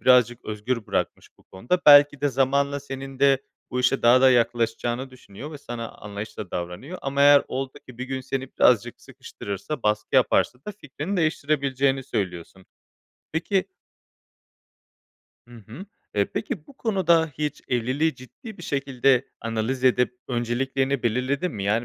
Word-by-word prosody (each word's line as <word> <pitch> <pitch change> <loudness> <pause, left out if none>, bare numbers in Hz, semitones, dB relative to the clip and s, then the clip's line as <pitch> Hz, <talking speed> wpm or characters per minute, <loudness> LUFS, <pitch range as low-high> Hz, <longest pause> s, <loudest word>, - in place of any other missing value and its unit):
birazcık 125 -1 +4
özgür 110 +2 -3
bırakmış - - -2
bu - - -23
konuda. 120 - -2
Belki 145 -1 +8
de 145 - +2
zamanla 140 +2 +1
senin 135 -1 -8
de 140 -1 +4 0.3
bu 125 - -1
işe 125 +2 +1
daha 120 +2 +6
da 130 0 +6
yaklaşacağını 120 +1 0
düşünüyor 130 +3 -11
ve 150 - -8
sana 120 -4 -6
anlayışlı 105 0 -8
da - - -31
davranıyor 90 - -6
ama 140 +1 -2
eğer 145 0 +7
oldu 135 0 -3 0.2
ki 125 -1 -12
bir 130 - -3
gün 130 0 -4
seni 135 0 -4
birazcık 120 0 +3
sıkıştırırsa, 130 -1 -7
baskı 105 0 -1
yaparsa 125 - +3
da 210 - -4
fikrini 160 +1 -5
değiştirebileceğini 140 -4 0
söylüyorsun. 95 -5 -5 0.7
Peki 185 +4 0 1.8
Hı 120 - -14
hı, 145 - -10 0.3
eee, - - +3
peki, - - -4
bu 280 -3 -17
konuda 170 -7 +2
hiç 150 -1 -3
evliliği 130 +6 0
ciddi 195 - -12
bir 175 - -10
şekilde 135 -2 +1
analiz 115 +3 -2
edip 125 -1 +3
önceliklerini 130 +2 -1
belirledin 130 +8 0
mi? 100 -4 -5
Yani 110 +4 +1
130 Hz, 150 wpm, -24 LUFS, 120-140 Hz, 1.8 s, Belki